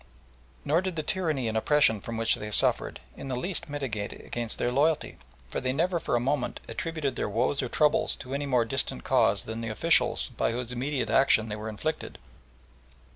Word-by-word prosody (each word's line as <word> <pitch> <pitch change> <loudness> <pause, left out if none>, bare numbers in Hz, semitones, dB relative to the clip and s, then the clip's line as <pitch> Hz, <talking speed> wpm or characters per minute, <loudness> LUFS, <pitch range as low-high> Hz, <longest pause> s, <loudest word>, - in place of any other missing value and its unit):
Nor 160 +4 +2
did 185 -2 -3
the 155 - -2
tyranny 155 -7 -1
and 110 - -2
oppression 110 -3 +3
from 115 +2 -6
which 115 0 +3
they 105 - -4
suffered 105 - +3 0.2
in 135 - -8
the 130 - -2
least 175 +5 -2
militate 130 -8 -4
against 120 -2 -3
their 120 - 0
loyalty, 150 +4 +1 0.3
for - - -3
they 130 0 -1
never 170 +4 0
for 150 - -1
a - - +3
moment 125 +1 -1
attributed 155 -4 -3
their - - -2
woes 125 +7 0
or 125 - -3
troubles 150 +3 +2
to 130 - -8
any 140 +1 -2
more 125 -3 +2
distant 115 - 0
cause - - +2
than 110 +1 -6
the 115 - -4
officials 110 - +3
by - - -1
whose 125 0 -4
immediate 130 +2 -2
action 115 -5 +4
they 105 - -3
were 110 +1 -6
inflicted. 155 +10 -4
130 Hz, 195 wpm, -27 LUFS, 115-150 Hz, 0.3 s, action